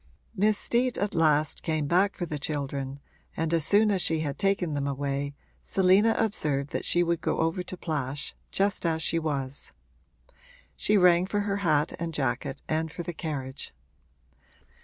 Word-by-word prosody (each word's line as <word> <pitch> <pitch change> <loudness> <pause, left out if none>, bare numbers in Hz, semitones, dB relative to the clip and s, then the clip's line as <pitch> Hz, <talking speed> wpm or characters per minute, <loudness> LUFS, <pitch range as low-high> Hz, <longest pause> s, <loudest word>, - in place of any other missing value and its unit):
Miss 210 +1 +3
Steet 245 +1 +1
at 205 0 -1
last 155 -3 +2
came 155 -2 -1
back 185 +6 +2
for 175 - -3
the 150 -3 -4
children, 140 -2 -3 0.4
and 165 0 -1
as 165 -2 +3
soon 210 +6 +5
as 190 -2 +2
she 160 -2 +1
had 145 -3 -3
taken 195 -5 +1
them 140 -1 -1
away 140 0 -2 0.3
Selina 195 +4 +4
observed 145 -10 -1
that - - -3
she 175 - +3
would 170 -1 0
go - - 0
over 165 +3 0
to 180 +1 -7
Plash 145 -5 -3 0.2
just 200 0 0
as 160 -2 0
she 165 +2 +2
was: 140 -4 -4 1.0
she 210 - +2
rang 180 -1 +5
for 205 +1 0
her 200 -1 -1
hat 155 -6 +1
and 165 -1 -3
jacket 135 -1 -2
and 160 0 -1
for 175 - -6
the 175 - -5
carriage. 140 -5 -5
160 Hz, 170 wpm, -27 LUFS, 145-185 Hz, 1.0 s, soon